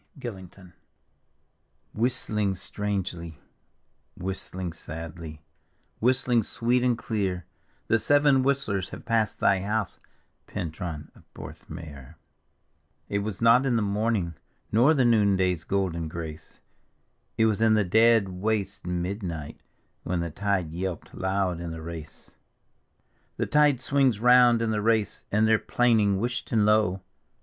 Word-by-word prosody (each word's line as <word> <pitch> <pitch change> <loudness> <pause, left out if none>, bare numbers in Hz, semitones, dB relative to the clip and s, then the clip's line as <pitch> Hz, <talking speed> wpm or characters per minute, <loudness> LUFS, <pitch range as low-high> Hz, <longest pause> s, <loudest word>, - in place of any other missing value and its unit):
gillincton 95 -6 -9 1.2
Whistling 105 -4 0
strangely, 90 -5 -4 0.8
whistling 95 -1 -5
sadly, 80 -1 -8 0.6
whistling 125 0 +2
sweet 120 +4 0
and 125 -2 +2
clear, 95 -7 -2 0.4
The 115 - +2
Seven 145 +3 +4
Whistlers 130 -9 0
have - - -10
passed 115 -2 0
thy 100 -1 +3
house, 105 0 -2 0.5
Pentnian 80 -1 -5
of - - -22
Porthmeor; 70 -5 -10 0.9
It 100 - 0
was 105 +1 -4
not 115 +3 +6
in 130 -3 +1
the 115 - +1
morning, 100 -3 0 0.4
nor 125 +9 +5
the 130 -3 +3
noonday's 95 -7 +2
golden 90 -4 -1
grace, 80 -1 -8 0.8
It 110 - +4
was 110 -1 +1
in 110 -1 +5
the 105 - +3
dead 110 +2 +4
waste 95 0 -3
midnight, 90 -4 -4 0.4
when 90 0 -2
the 85 -1 -3
tide 95 -2 -1
yelped' 90 0 -5
loud 95 -2 -1
in 85 -1 -5
tHe 80 - -7
Race: 80 -3 -9 1.0
The - - 0
tide 150 -3 +3
swings 130 -4 +2
round 125 -1 +5
in 110 - 0
the 105 -1 0
Race, 110 -1 0
and 110 +2 +3
they're 110 -1 +4
plaining 110 -5 +2
whisht 120 +3 -3
and 110 -3 +3
low. 105 -3 +2
100 Hz, 125 wpm, -26 LUFS, 90-115 Hz, 1.2 s, not